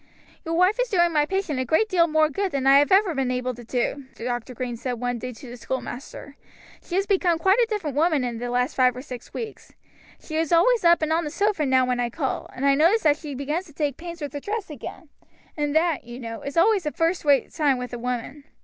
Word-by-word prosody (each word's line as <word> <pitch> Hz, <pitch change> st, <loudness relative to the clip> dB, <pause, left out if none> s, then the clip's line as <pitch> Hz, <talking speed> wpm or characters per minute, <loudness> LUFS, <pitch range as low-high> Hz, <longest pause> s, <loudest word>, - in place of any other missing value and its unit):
"Your 330 Hz, 0 st, -2 dB
wife 375 Hz, +6 st, +3 dB
is -, -, -1 dB
doing 345 Hz, -4 st, +2 dB
my 295 Hz, -1 st, +2 dB
patient 380 Hz, -8 st, -1 dB
a -, -, +1 dB
great 320 Hz, -, +2 dB
deal 345 Hz, -4 st, +3 dB
more 310 Hz, -1 st, +3 dB
good 380 Hz, +6 st, -2 dB
than 275 Hz, -2 st, -2 dB
I 275 Hz, +1 st, +7 dB
have 290 Hz, -, +2 dB
ever 385 Hz, -2 st, +4 dB
been 270 Hz, -3 st, -1 dB
able 250 Hz, 0 st, -1 dB
to 240 Hz, 0 st, -11 dB
do," 255 Hz, +4 st, -2 dB
Dr. 245 Hz, +1 st, -4 dB
Green 250 Hz, -1 st, -4 dB
said 250 Hz, +2 st, -4 dB
one 245 Hz, 0 st, -3 dB
day 250 Hz, +2 st, -5 dB
to 250 Hz, +2 st, -12 dB
the 245 Hz, +1 st, -9 dB
schoolmaster. 260 Hz, +3 st, -6 dB, 0.4 s
"She 350 Hz, -, -6 dB
has 390 Hz, +1 st, +2 dB
become 370 Hz, -4 st, +2 dB
quite 380 Hz, +7 st, +3 dB
a 475 Hz, -, +4 dB
different 340 Hz, -, -3 dB
woman 310 Hz, -2 st, +2 dB
in 240 Hz, -2 st, -3 dB
the 245 Hz, +1 st, -4 dB
last 250 Hz, +1 st, 0 dB
five 255 Hz, -2 st, +3 dB
or 255 Hz, -, -7 dB
six 250 Hz, -3 st, -9 dB
weeks. 445 Hz, -2 st, -7 dB, 0.5 s
She 315 Hz, -, -5 dB
is 325 Hz, -1 st, 0 dB
always 435 Hz, +8 st, +4 dB
up 340 Hz, -1 st, +5 dB
and 315 Hz, +1 st, +1 dB
on 335 Hz, +1 st, +1 dB
the 300 Hz, -, -3 dB
sofa 390 Hz, -2 st, 0 dB
now 260 Hz, -1 st, +4 dB
when 250 Hz, -1 st, -1 dB
I 240 Hz, -1 st, 0 dB
call, 265 Hz, +2 st, -3 dB
and 265 Hz, -, -2 dB
I 280 Hz, -, +5 dB
notice 335 Hz, +10 st, +3 dB
that 300 Hz, -2 st, +4 dB
she 300 Hz, -3 st, -7 dB
begins 300 Hz, +7 st, -3 dB
to 300 Hz, -, -16 dB
take 290 Hz, -3 st, -1 dB
pains 340 Hz, 0 st, -8 dB
with 290 Hz, -2 st, -5 dB
her 290 Hz, -, -4 dB
dress 410 Hz, +2 st, -4 dB
again; 300 Hz, +3 st, -9 dB, 0.5 s
and 295 Hz, -1 st, -2 dB
that, 320 Hz, -2 st, +2 dB
you 240 Hz, +1 st, -9 dB
know, 230 Hz, -2 st, -6 dB
is 280 Hz, +3 st, -6 dB
always 385 Hz, -1 st, +3 dB
a -, -, 0 dB
first 330 Hz, +3 st, 0 dB
rate 285 Hz, -2 st, +2 dB
sign 290 Hz, -5 st, +2 dB
with 250 Hz, -1 st, -6 dB
a 240 Hz, -, -4 dB
woman. 250 Hz, +4 st, -4 dB
295 Hz, 255 wpm, -24 LUFS, 255-340 Hz, 0.5 s, I